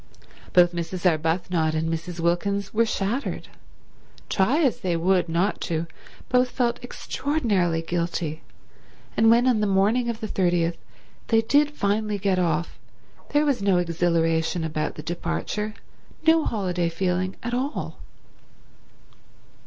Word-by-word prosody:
Both 175 -1 +5
Mrs. 175 +2 -4
Arbuthnot 160 0 +1
and 160 +1 0
Mrs. 165 +2 -4
Wilkins 195 +4 0
were 230 +1 +3
shattered; 215 +6 -2 0.8
try 250 - +2
as 265 - +1
they 175 -2 -1
would 180 0 +2
not 175 +5 0
to, 165 0 -1 0.4
both 250 0 +3
felt 240 -1 -1
extraordinarily 210 - -1
guilty; 170 -2 -2 0.7
and 225 0 +5
when 235 +2 +5
on 250 -4 +3
the 210 - +1
morning 210 +5 +2
of 230 -1 -3
the 220 - -4
30th 175 -4 +1 0.5
they 225 -1 +4
did 290 +6 +3
finally 210 -5 -1
get 195 -2 +1
off 170 -1 -1 0.5
there 295 +1 +2
was 280 -7 +1
no 195 -2 +3
exhilaration 165 -1 +1
about 155 -1 -2
the 150 - -8
departure, 175 +6 -3 0.5
no 320 -1 +5
holiday 180 -6 -1
feeling 185 +2 -1
at 235 +1 -3
all. 265 +4 -3
185 Hz, 130 wpm, -24 LUFS, 170-225 Hz, 0.8 s, Both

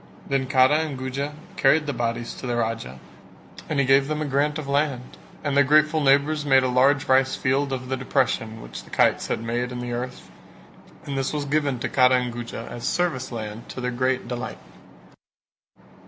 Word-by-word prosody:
Then 135 -1 0
Kara 130 +3 +4
and 155 -4 -3
Guja 135 +3 -4 0.2
carried 150 0 +4
the 145 - -2
bodies 120 -1 -2
to 130 - -7
the 120 - -1
Raja 110 - -3 0.7
and 150 - 0
he 140 - +3
gave 135 +1 +4
them 155 0 -2
a 155 - -1
grant 145 +2 0
of 155 -3 -6
land; 140 -3 -1 0.3
and 145 -2 -1
their 140 - +6
grateful 155 +2 +3
neighbours 145 +2 +3
made 135 -2 +4
a - - +2
large 135 +2 +3
rice 130 0 +3
field 135 +1 0
of 130 -1 -4
the 130 - -1
depression 115 -3 -1
which - - -9
the - - -17
kites - - +2
had 115 - -2
made 120 +2 -2
in 125 - -5
the 120 0 -4
earth 125 +1 -6 0.7
and 140 - -4
this 135 - -1
was 150 -1 -2
given 145 -2 0
to - - -1
Kara 130 -1 +4
and 125 -1 -1
Guja 120 -1 -6
as 120 - -7
service 165 -9 -1
land 110 -1 -6
to - - -7
their 125 0 -2
great 130 0 -1
delight. 125 0 -5
130 Hz, 200 wpm, -24 LUFS, 125-145 Hz, 0.7 s, their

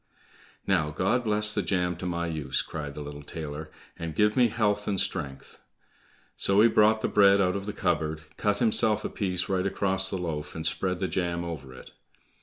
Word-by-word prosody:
"Now, 85 -6 +2
God 95 +11 0
bless 105 -1 +2
the 105 - 0
jam 90 0 0
to 90 - -5
my 85 -1 -2
use," 75 -5 -1
cried 75 -3 -6
the 75 - -6
little 75 0 -8
tailor, 75 0 -6 0.3
"and 80 -2 -5
give 105 +3 +3
me 125 -2 +5
health 105 -2 0
and 100 -2 0
strength;" 70 -9 -2 0.8
so 100 +1 +3
he 115 - +7
brought 110 0 +4
the - - +1
bread 100 -1 +5
out 90 -1 +2
of 100 0 -4
the - - -1
cupboard, 80 -6 -1
cut 105 -1 0
himself 110 -2 +2
a - - -1
piece 90 -3 -2
right 95 -1 0
across 95 -1 +1
the 95 - -2
loaf 80 -4 -4
and 80 0 -4
spread 90 +2 0
the 95 +1 -1
jam 85 -2 -2
over 75 -6 -6
it. 65 - -13
90 Hz, 200 wpm, -27 LUFS, 80-105 Hz, 0.8 s, he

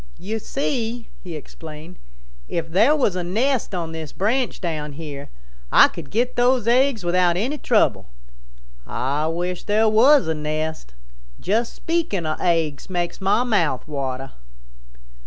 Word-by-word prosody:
"You 220 +4 -4
see," 240 -2 -3
he 175 -4 -7
explained, 155 +3 -10 0.5
"if 165 -1 -2
there 220 - +5
was 255 -11 +1
a 180 - -2
nest 225 +4 0
on 165 -2 -3
this 160 -2 -6
branch 235 +5 0
down 155 -4 -3
here, 145 -2 -8 0.4
Ah - - +7
could 155 -5 -9
get 240 - 0
those 245 -1 +2
eggs 250 -2 +3
without 175 0 +2
any 265 +10 -1
trouble. - - +2 0.8
Ah 145 +4 -1
wish 175 +2 -3
there 215 +2 +3
was 250 - +5
a 160 - +1
nest. 155 - -4 0.4
Just 225 +4 0
speaking 325 - -1
of 155 0 -2
eggs 165 -4 0
makes 175 +1 -3
mah 195 +5 +3
mouth 170 - +1
water." 135 -3 -4
180 Hz, 140 wpm, -22 LUFS, 155-230 Hz, 0.8 s, Ah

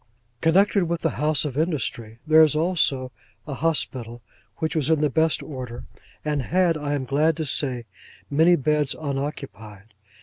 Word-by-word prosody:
Connected 195 +3 +3
with 170 0 -3
the 165 - -2
House 150 -1 +2
of 140 -4 -4
Industry, 120 -8 -2
there 155 0 +6
is 155 -2 +4
also 155 -6 0 0.3
an 150 - -6
Hospital, 130 -7 -2 0.3
which 160 -1 -2
was 155 -2 0
in 160 -2 +3
the 150 -2 +1
best 160 +3 +1
order, 125 -5 -7 0.4
and 150 -2 0
had, 175 +4 +1
I 145 -1 -2
am 135 -2 -3
glad 150 +5 +1
to 160 - -2
say, 130 -3 +2 0.4
many 160 +5 +4
beds 150 -1 0
unoccupied. 135 -8 -6
150 Hz, 160 wpm, -23 LUFS, 130-160 Hz, 0.4 s, there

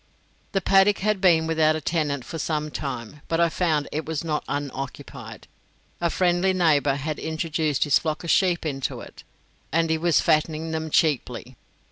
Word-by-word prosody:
The 195 - +1
paddock 195 +2 +4
had 210 -1 0
been 165 -4 +4
without 160 -1 +2
a - - -2
tenant 150 -4 -1
for 165 - -6
some 155 -1 -2
time, 135 +1 -6
but 165 - 0
I 170 0 +4
found 160 -4 0
it 155 +2 -2
was 160 -1 -4
not 155 -2 -2
unoccupied. 140 -2 -6 0.5
A 170 - +2
friendly 180 +2 +2
neighbour 150 -6 +3
had 150 +2 -4
introduced 160 -2 -1
his 145 -4 +3
flock 155 0 -3
of 170 - 0
sheep 180 -4 +2
into 135 -3 -3
it, - - -12 0.5
and 165 +1 +1
he 160 - +1
was 170 0 +3
fattening 155 +1 +1
them 160 0 -3
cheaply. 130 -5 0
160 Hz, 170 wpm, -24 LUFS, 145-170 Hz, 0.5 s, paddock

